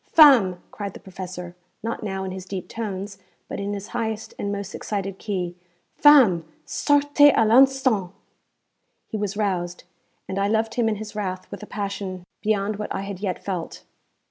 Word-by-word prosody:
'Femme!' 240 - +6
cried 200 -2 -6
the - - -8
professor, 180 -2 -8 0.3
not 230 +1 -3
now 195 -3 -3
in 190 - -4
his 185 0 -7
deep 190 -2 -5
tones, 200 -3 -5 0.3
but - - -5
in 200 +1 -2
his 200 0 -7
highest 220 -1 -3
and 200 - -2
most 200 0 -4
excited 195 -2 -4
key 180 -4 -3 0.4
'femme! 255 - +6 0.2
sortez 290 0 +4
à 225 - +4
l'instant!' 255 -5 +4 0.9
He 220 - -5
was 205 -1 -3
roused, 180 -4 -1 0.4
and 190 - -2
I 200 - +2
loved 220 +1 +1
him 235 -2 +2
in 215 - 0
his 210 +1 -8
wrath 185 -3 -3
with - - -7
a 210 - -8
passion 200 -3 -4 0.2
beyond 210 -1 0
what 210 - -5
I - - -2
had 195 -2 -6
yet 190 -3 -3
felt. 180 -4 -4
200 Hz, 170 wpm, -24 LUFS, 190-220 Hz, 0.9 s, Femme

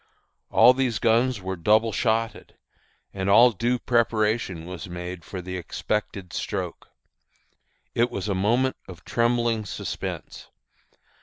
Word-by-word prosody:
All 120 +3 +7
these 130 -4 0
guns 115 +1 +2
were 95 0 -3
double 110 +5 +3
shotted, 115 +1 -1 0.6
and 95 0 -2
all 120 +5 +7
due 120 +4 0
preparation 110 -7 0
was 90 0 -7
made 90 0 -6
for 90 -2 -7
the 90 +1 -5
expected 95 +1 -3
stroke. - - -4 1.1
It 120 +1 +2
was 100 +1 -4
a 100 - 0
moment 120 +8 +1
of 90 -2 -12
trembling 120 -1 +1
suspense. 100 - -6
110 Hz, 125 wpm, -25 LUFS, 95-120 Hz, 1.1 s, All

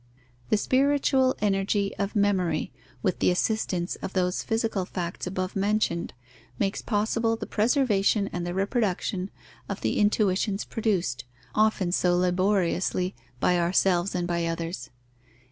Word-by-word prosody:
The - - +4
spiritual 265 +1 +2
energy 200 0 +1
of 200 +1 -2
memory, 200 -4 +1 0.3
with 185 -4 0
the - - +3
assistance 180 -1 0
of 190 - -6
those 180 -1 0
physical 225 -3 -1
facts 180 -1 -4
above 185 0 -3
mentioned, 200 -4 0 0.4
makes 195 +1 -1
possible 225 +1 0
the - - -6
preservation 215 -4 +2
and 175 - -2
the 175 +1 -3
reproduction 195 -2 -1 0.4
of 200 - -4
the - - 0
intuitions 205 -1 +1
produced, 180 - -1 0.3
often 215 -4 +2
so 175 -1 +2
laboriously, 185 0 +1 0.3
by 180 +5 +3
ourselves 175 +1 +2
and 175 -1 -1
by 170 -1 0
others. 165 -7 -4
195 Hz, 130 wpm, -26 LUFS, 180-215 Hz, 0.4 s, The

